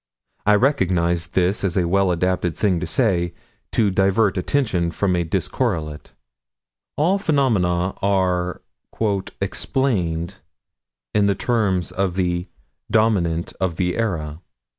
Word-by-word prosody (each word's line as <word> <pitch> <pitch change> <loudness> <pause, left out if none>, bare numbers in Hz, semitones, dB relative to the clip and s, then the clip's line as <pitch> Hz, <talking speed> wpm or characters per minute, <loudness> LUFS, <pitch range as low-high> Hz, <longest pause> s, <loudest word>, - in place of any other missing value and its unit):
I 105 - +6
recognize 90 - +1
this 90 +4 0
as 95 -1 0
a 90 -2 +2
well 95 +1 +2
adapted 90 -1 0
thing 95 -5 +1
to 90 - -4
say, 85 -2 +1 0.4
to 105 -4 +2
divert 95 +2 +2
attention 95 -4 0
from 90 +2 0
a 85 - +1
discorrelate. 85 - -2 0.9
All 175 +7 +2
phenomena 100 - +1
are 90 -2 0 0.8
"explained" 95 -5 -1 0.8
in 100 -1 +3
the 100 - +2
terms 100 -5 0
of 95 -2 -1
the 90 -1 -1 0.4
Dominant 95 -7 +1
of 95 -3 -1
their 90 0 0
era. 80 -8 -2
95 Hz, 120 wpm, -21 LUFS, 85-105 Hz, 0.9 s, I